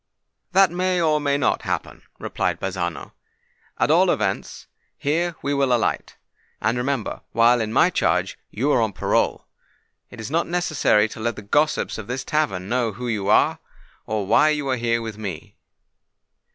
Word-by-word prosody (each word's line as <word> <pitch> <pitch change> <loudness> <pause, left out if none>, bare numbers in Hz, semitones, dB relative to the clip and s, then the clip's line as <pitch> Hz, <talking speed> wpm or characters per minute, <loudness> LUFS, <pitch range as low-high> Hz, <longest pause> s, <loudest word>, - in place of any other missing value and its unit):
"That 190 -2 +5
may, 180 +1 0
or 155 -2 +2
may 140 -1 +1
not 140 - +1
happen," - - -4 0.2
replied - - -2
Bazzano. 90 -3 -4 0.7
"At - - +2
all - - +4
events, - - -2 0.3
here 170 +4 -1
we 140 - 0
will 140 -2 +1
alight: 120 -2 0 0.4
and, 110 +3 0
remember, 125 -1 -2
while 115 +1 +4
in 110 -1 -2
my - - +4
charge, - - 0
you 135 +7 0
are 125 - +3
on 110 - +1
your - - -14
parole. - - 0 0.6
It 125 - -12
is 110 +3 -6
not 165 +2 +1
necessary 155 - +2
to - - -10
let 115 0 -1
the 105 - -9
gossips 150 +4 0
of 110 - -8
this 125 +2 -3
tavern 130 -13 -1
know 120 -1 0
who 125 +4 -6
you 105 -4 -2
are, - - +3 0.5
or 110 -2 -2
why 155 +10 +4
you 150 -2 -1
are 130 - +2
here 115 -1 0
with 110 -2 -7
me." 95 -7 -7
125 Hz, 175 wpm, -22 LUFS, 110-150 Hz, 0.7 s, That